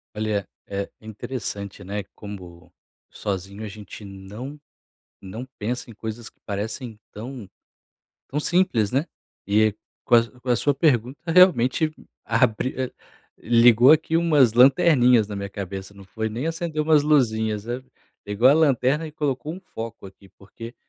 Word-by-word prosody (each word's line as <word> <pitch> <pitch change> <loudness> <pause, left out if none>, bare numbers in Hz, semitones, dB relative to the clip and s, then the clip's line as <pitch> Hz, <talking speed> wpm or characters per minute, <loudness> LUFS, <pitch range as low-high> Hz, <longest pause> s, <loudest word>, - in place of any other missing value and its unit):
Olha 105 -2 -1 0.2
é 100 0 -4
interessante, 105 -2 -6
né, 100 +2 -4
como 90 -5 -10 0.4
sozinho 100 +1 -5
a - - -4
gente 105 0 -10
não 105 +9 -9 0.6
não 110 +6 -7
pensa 120 +4 -4
em - - -10
coisas 110 +1 -7
que - - -41
parecem 110 +2 -5
tão 115 0 -8 0.8
tão 145 - -2
simples, 150 - +1
né, 135 +5 +1 0.4
e 105 +1 +3 0.3
com 120 - +4
a 115 +1 +2
com 125 - -6
a 120 - +4
sua 145 +5 +1
pergunta 130 -3 +1
realmente 160 -4 +5 0.3
abriu 125 +2 0 0.5
ligou 120 +2 +6
aqui 160 +1 +3
umas 150 -9 +4
lanterninhas 125 - +5
na 105 - -6
minha 100 0 -4
cabeça, 95 0 -7
não 100 -1 -13
foi 110 +3 -3
nem 120 +6 -4
acendeu 165 -2 -2
umas 155 -1 +4
luzinhas, 110 -8 +1 0.6
igual 105 +6 +4
a - - +6
lanterna 150 0 +2
e - - -10
colocou 150 0 -2
um 180 - -8
foco 115 - -8
aqui, 95 0 -15
porque 115 +4 -11
115 Hz, 145 wpm, -24 LUFS, 105-135 Hz, 0.8 s, ligou